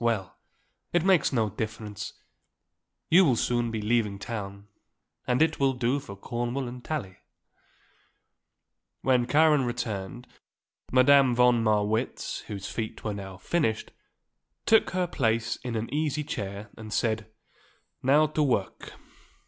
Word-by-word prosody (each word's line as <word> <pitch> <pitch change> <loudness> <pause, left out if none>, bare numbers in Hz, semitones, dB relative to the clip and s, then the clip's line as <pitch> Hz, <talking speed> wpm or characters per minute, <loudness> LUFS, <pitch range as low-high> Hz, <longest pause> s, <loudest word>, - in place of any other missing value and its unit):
Well; 110 -6 0 0.6
it 175 0 +2
makes 185 -6 +4
no 110 -5 +1
difference; 110 -1 -5 1.0
you 180 +4 +8
will 135 -8 +4
soon 120 0 0
be 110 -2 -3
leaving 105 -2 +1
town 100 -1 -6 0.6
and 125 +4 +3
it 160 -1 0
will 135 -1 +3
do 125 +2 0
for 130 -8 -9
Cornwall 120 +5 -3
and 125 0 -8
Tallie." 100 -13 -4 1.8
When 125 -2 +2
Karen 150 -1 +4
returned, 120 -1 -4 0.7
Madame 130 0 +5
von 125 -1 +4
Marwitz, 110 0 0
whose 100 -2 -5
feet 110 -2 -5
were 105 - -2
now 95 -2 -7
finished, 110 - -1 0.7
took 220 - +5
her 185 -1 0
place 115 -8 0
in 125 -2 -5
an 110 +1 -2
easy 150 0 0
chair 100 -4 -5
and 110 -1 -9
said: 110 -1 0 0.7
"Now 145 +4 +5
to 155 0 -1
work. 125 -9 -1
120 Hz, 130 wpm, -27 LUFS, 105-140 Hz, 1.8 s, you